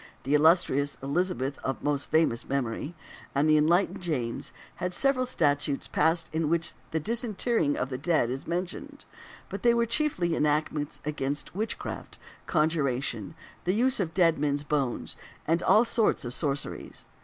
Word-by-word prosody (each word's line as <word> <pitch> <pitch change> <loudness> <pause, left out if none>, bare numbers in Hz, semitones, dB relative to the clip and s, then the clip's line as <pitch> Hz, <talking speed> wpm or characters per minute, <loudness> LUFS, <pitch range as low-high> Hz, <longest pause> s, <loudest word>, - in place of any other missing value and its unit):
the 140 - -1
illustrious 150 -2 +3
Elizabeth 140 -3 -1
of 135 - -3
most 145 -1 -1
famous 155 -7 +1
memory, 140 +4 -2 0.4
and 140 +3 +3
the 155 - +5
enlightened 170 +7 +2
James, 130 -10 -3 0.3
had 180 0 -2
several 265 +1 +3
statutes 145 - 0
passed 165 +1 +2
in 160 -1 0
which 165 0 0 0.2
the 160 - -1
disinterring 225 - 0
of 125 - -2
the 130 - -3
dead 155 -6 +1
is 135 +1 -5
mentioned, 175 +2 -4 0.4
but - - -6
they 235 -1 +4
were 235 0 +3
chiefly 220 - 0
enactments 150 -1 0
against 145 -1 -2
witchcraft, 215 +5 -4 0.3
conjuration, 140 - 0 0.3
the 180 +3 +1
use 255 +3 +3
of 175 -5 -1
dead 165 -5 +4
men's 145 0 0
bones, 140 -5 -2 0.3
and 165 +2 +2
all 220 +3 +5
sorts 230 - +1
of 120 - -3
sorceries. 140 0 -3
155 Hz, 150 wpm, -28 LUFS, 140-180 Hz, 0.4 s, the